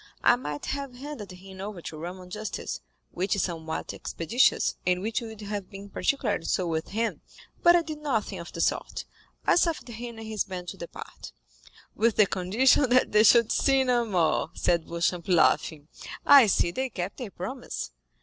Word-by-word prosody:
I - - +6
might 150 -12 -5
have 275 -2 -4
handed 255 -7 -7
him 190 +1 -11
over 200 -2 -6
to - - -6
Roman 180 +2 -7
justice, 215 +2 -5 0.3
which 190 +4 0
is 200 - 0
somewhat 160 -2 -4
expeditious, 230 +10 +1
and 180 0 +2
which 220 +5 -2
would 220 -2 -8
have 205 -2 -5
been 200 +1 -10
particularly 220 -10 0
so 185 - 0
with 160 -1 -2
him; 225 +2 -2 0.4
but 345 0 +7
I 345 - +3
did 310 -2 -6
nothing 220 -10 -2
of 170 - -8
the 165 - -4
sort—I - - -2
suffered 325 -8 +1
him 235 0 -7
and 225 0 -8
his 215 -2 -1
band 180 -2 -6
to - - -8
depart." 170 - -9 0.6
"With 225 0 +2
the 215 - +6
condition 220 +9 +3
that 255 +1 +4
they 210 - +6
should 230 +1 +6
sin 270 -1 +3
no 245 -1 +2
more," 180 -7 +1
said 170 -2 +1
Beauchamp, 170 +1 -1
laughing. 160 -4 +2 0.4
"I 280 -5 +9
see 175 -3 +2
they 260 +8 -2
kept 185 -3 -5
their 245 -5 -5
promise." 215 - -6
210 Hz, 180 wpm, -27 LUFS, 180-245 Hz, 0.6 s, I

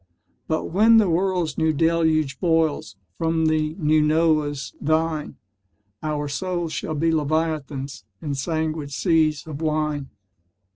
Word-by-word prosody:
But 160 - 0
when 220 +5 +6
the 215 -3 +5
world's 180 -3 0
New 160 0 +2
Deluge 160 -3 +1
boils 160 - +1 0.2
From 165 0 +1
the 155 0 +1
New 155 -3 +2
Noah's 150 -4 +1
vine, 155 -1 0 0.7
Our 150 -1 -2
souls 170 +3 -3
shall 155 - -3
be 165 +2 +1
Leviathans 150 -3 -2 0.2
In 145 -2 -4
sanguine 155 +1 -2
seas 155 -1 +1
of 155 -1 -7
wine. 150 -3 -1
155 Hz, 125 wpm, -23 LUFS, 150-165 Hz, 0.7 s, when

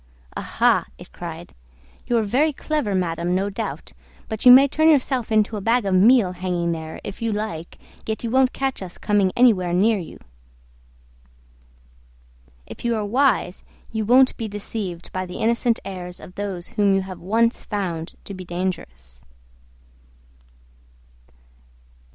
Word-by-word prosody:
"Aha!" - - +1
it - - -14
cried, - - -8 0.5
"you're 235 -2 +2
very 265 +9 +2
clever, 290 -8 -2
madam, 175 -1 -1
no 195 +2 -1
doubt: 195 - -6 0.3
but 220 +3 -1
you - - +12
may 270 +3 +9
turn 315 +3 +3
yourself 260 -6 +1
into 215 0 +2
a - - -5
bag 230 +2 +2
of 195 - 0
meal 205 +1 +5
hanging 175 -2 -2
there, 160 -1 -6
if 200 - -8
you 230 -1 0
like, 205 -6 -5 0.3
yet 220 +1 -3
you 230 - -2
won't 260 0 +3
catch 270 -4 -3
us 180 -2 -8
coming 205 -3 +1
anywhere 200 -8 +4
near 210 +4 +3
you." 170 - -9 2.5
If - - -11
you 235 -1 +1
are 215 -1 -2
wise 235 -4 +1 0.3
you 220 -1 -2
won't 255 +4 +5
be 225 - -3
deceived 200 -4 -6
by 185 0 -3
the 180 - -7
innocent 235 +1 +1
airs 180 -2 -7
of 180 - -12
those 195 -3 -5
whom 200 -2 +2
you 195 - +2
have 185 -1 -8
once 230 +6 +1
found 175 -6 -4
to 200 - -8
be 185 -1 -8
dangerous. 65 - -5
205 Hz, 150 wpm, -22 LUFS, 180-235 Hz, 2.5 s, you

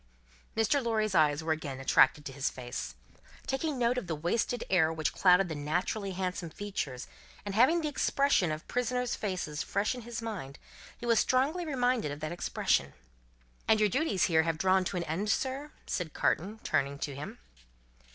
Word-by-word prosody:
Mr. 255 +5 +2
Lorry's 215 -3 0
eyes 150 -2 +3
were 160 - -1
again 145 -4 -3
attracted 145 +2 +4
to - - -5
his 135 0 -1
face. 125 0 -6 0.5
Taking 275 +2 -1
note 245 +1 +2
of 225 - -9
the 165 - -1
wasted 215 +9 -1
air 160 -4 +3
which 160 -1 -1
clouded 180 0 +5
the 165 - -4
naturally 175 +7 -2
handsome 180 -2 -3
features, 155 -9 -4 0.4
and 200 - -3
having 260 +11 +4
the 310 - -1
expression 280 - +2
of 155 +1 -5
prisoners' 250 0 -1
faces 180 -8 -3
fresh 200 - 0
in 250 - -7
his 235 -1 -6
mind, 200 -12 -6 0.4
he - - -8
was 230 -2 +4
strongly 300 +7 +1
reminded 250 - +1
of 145 - -6
that 155 +1 -4
expression. 70 - 0 0.7
"And 220 - +5
your 210 -1 +4
duties 250 - +1
here 160 -2 +4
have 165 -1 -1
drawn 190 +2 +3
to 180 - -2
an 175 - -1
end, 175 +7 -2
sir?" 270 +6 -1 0.2
said 175 -5 -3
Carton, 200 +7 0
turning 140 0 0
to 145 0 -4
him. 140 +3 -7
190 Hz, 180 wpm, -30 LUFS, 155-240 Hz, 0.7 s, clouded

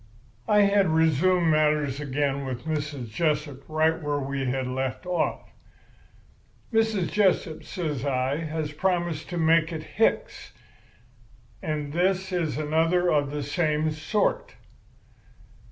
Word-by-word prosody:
"I 210 0 +5
had 200 -1 +4
resumed 160 +2 +3
matters 150 -3 +2
again 140 -1 -1
with 130 0 -5
Mrs. 145 -6 -3
Jessup 150 0 -1
right 160 +1 +1
where 145 -1 -1
we 140 -1 -3
had 130 +1 -1
left 130 +5 -3
off. 180 -1 -2 1.2
"'Mrs. 220 -5 +1
Jessup,' 190 -6 +1
says 150 -8 -4
I, 135 0 0
'has 155 -1 -3
promised 175 -1 -1
to 175 - -4
make 165 0 +3
it 160 -2 -5
Hicks. - - -1 1.1
And 150 -2 -3
this 190 +2 +1
is 170 -5 -1
another 165 +4 +2
of 145 -2 +2
the 145 0 -3
same 155 +1 0
sort. 210 - -1
155 Hz, 120 wpm, -26 LUFS, 145-175 Hz, 1.2 s, I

